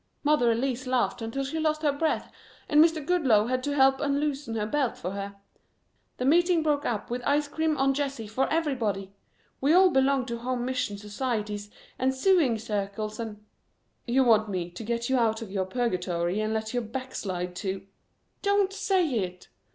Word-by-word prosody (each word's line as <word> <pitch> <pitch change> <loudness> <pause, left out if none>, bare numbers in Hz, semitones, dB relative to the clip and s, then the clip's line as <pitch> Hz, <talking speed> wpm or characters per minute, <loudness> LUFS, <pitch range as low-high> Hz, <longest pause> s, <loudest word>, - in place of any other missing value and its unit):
Mother 295 -5 +3
Elsie 255 +2 -1
laughed 245 -1 +1
until 225 +5 -3
she 280 +4 -3
lost 310 0 0
her 295 - +4
breath 310 +3 -1 0.4
and 300 +1 +6
Mr. 320 -3 +1
Goodloe 265 -12 +3
had 255 +2 -1
to 290 0 -1
help 270 -1 +4
unloosen 285 -3 -1
her 210 -1 -1
belt 270 +2 0
for 180 - -4
her. 200 0 -5 0.8
The 250 - -2
meeting 340 +3 +4
broke 295 -2 +1
up 225 -1 -3
with 245 +1 -2
ice 290 +2 +2
cream 315 0 0
on 270 0 +3
Jessie 275 -4 -3
for 220 +6 -1
everybody. 230 - -1 0.5
We 285 +4 +4
all 370 +1 +6
belong 270 -2 +2
to 235 -2 -4
home 245 0 -2
mission 250 -5 -2
societies 210 -1 -3 0.3
and 265 +1 +1
sewing 300 - +3
circles 210 0 -3
and 210 -2 -6 0.3
" - - -46
"You 260 +3 +3
want 220 -3 +4
me 180 -3 -3
to 180 +6 -8
get 235 +1 -2
you 265 -1 +2
out 225 -1 +1
of 205 - -10
your 190 -2 -1
purgatory 185 -4 -1
and 215 0 -1
let 220 +1 -2
you 245 - 0
backslide 205 -7 -4
to 190 0 -4 0.3
" - - -46
"Don't 400 -1 +2
say 390 -3 +1
it!" 185 -9 -3
250 Hz, 185 wpm, -27 LUFS, 210-285 Hz, 0.8 s, and